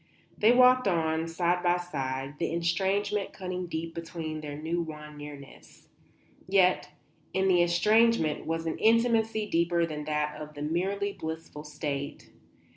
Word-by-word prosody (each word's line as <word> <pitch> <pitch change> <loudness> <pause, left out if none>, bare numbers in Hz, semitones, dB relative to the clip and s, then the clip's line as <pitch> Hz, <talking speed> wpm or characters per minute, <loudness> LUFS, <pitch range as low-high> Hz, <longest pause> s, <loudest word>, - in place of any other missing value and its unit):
They 215 +2 +5
walked 255 -1 +6
on, 160 -2 +1
side 175 +1 0
by 175 0 +3
side, 135 -4 -4
the 170 - -1
estrangement 195 +4 0
cutting 185 -1 -4
deep 165 0 -4
between 165 -2 -5
their 145 -1 -6
new 165 +3 -2
won 150 -2 -8
nearness. 145 -2 -12 0.6
Yet 185 -1 +3 0.5
in 190 0 +2
the 180 -2 +5
estrangement 190 0 +3
was 165 0 -2
an 160 - -3
intimacy 225 -1 +3
deeper 170 -1 +2
than 150 -2 -5
that 150 0 -2
of 150 0 -9
the 145 - -5
merely 195 +6 -1
blissful 160 -3 -7
state. 145 -1 -5
170 Hz, 140 wpm, -28 LUFS, 155-190 Hz, 0.6 s, walked